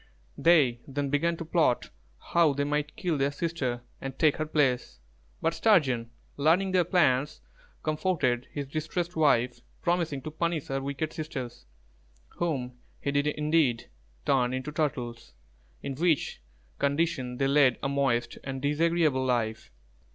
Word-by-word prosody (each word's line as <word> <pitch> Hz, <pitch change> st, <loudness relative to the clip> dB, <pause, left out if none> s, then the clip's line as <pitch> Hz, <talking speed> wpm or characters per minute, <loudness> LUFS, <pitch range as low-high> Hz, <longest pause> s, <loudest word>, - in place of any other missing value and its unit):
They 145 Hz, -8 st, +4 dB
then 140 Hz, 0 st, -2 dB
began 165 Hz, +4 st, +1 dB
to 165 Hz, -, -6 dB
plot 160 Hz, -6 st, +1 dB, 0.4 s
how 170 Hz, -4 st, +5 dB
they 140 Hz, +1 st, -1 dB
might 150 Hz, +1 st, -1 dB
kill 170 Hz, -6 st, -1 dB
their 140 Hz, +1 st, +2 dB
sister 145 Hz, -6 st, -2 dB, 0.2 s
and 135 Hz, -1 st, -6 dB
take 155 Hz, -3 st, +3 dB
her 155 Hz, -, -2 dB
place; 130 Hz, -, +1 dB, 0.5 s
but 165 Hz, -, +2 dB
Sturgeon, 135 Hz, -, +3 dB, 0.3 s
learning 170 Hz, +7 st, +3 dB
their 185 Hz, -1 st, +4 dB
plans, 150 Hz, -, +2 dB, 0.4 s
comforted 155 Hz, -6 st, 0 dB
his 145 Hz, -1 st, -4 dB
distressed 165 Hz, +5 st, -3 dB
wife, 125 Hz, -6 st, +2 dB, 0.2 s
promising 170 Hz, -6 st, 0 dB
to 155 Hz, -, -5 dB
punish 165 Hz, -1 st, -2 dB
her 135 Hz, 0 st, -1 dB
wicked 140 Hz, +3 st, -3 dB
sisters, 130 Hz, -, -6 dB, 0.6 s
whom 125 Hz, -8 st, -3 dB, 0.2 s
he 140 Hz, -, -2 dB
did 145 Hz, +1 st, +1 dB
indeed 150 Hz, -5 st, +1 dB, 0.3 s
turn 130 Hz, -2 st, +2 dB
into 130 Hz, +3 st, -4 dB
turtles, 125 Hz, -, -3 dB, 0.5 s
in 140 Hz, -, -3 dB
which 160 Hz, -, 0 dB, 0.4 s
condition 140 Hz, -4 st, 0 dB
they 135 Hz, -, +1 dB
led 140 Hz, -3 st, +4 dB
a -, -, +1 dB
moist 135 Hz, -4 st, 0 dB
and 135 Hz, 0 st, -4 dB
disagreeable 155 Hz, -2 st, +2 dB
life. 120 Hz, -4 st, -1 dB
145 Hz, 140 wpm, -28 LUFS, 130-160 Hz, 0.6 s, how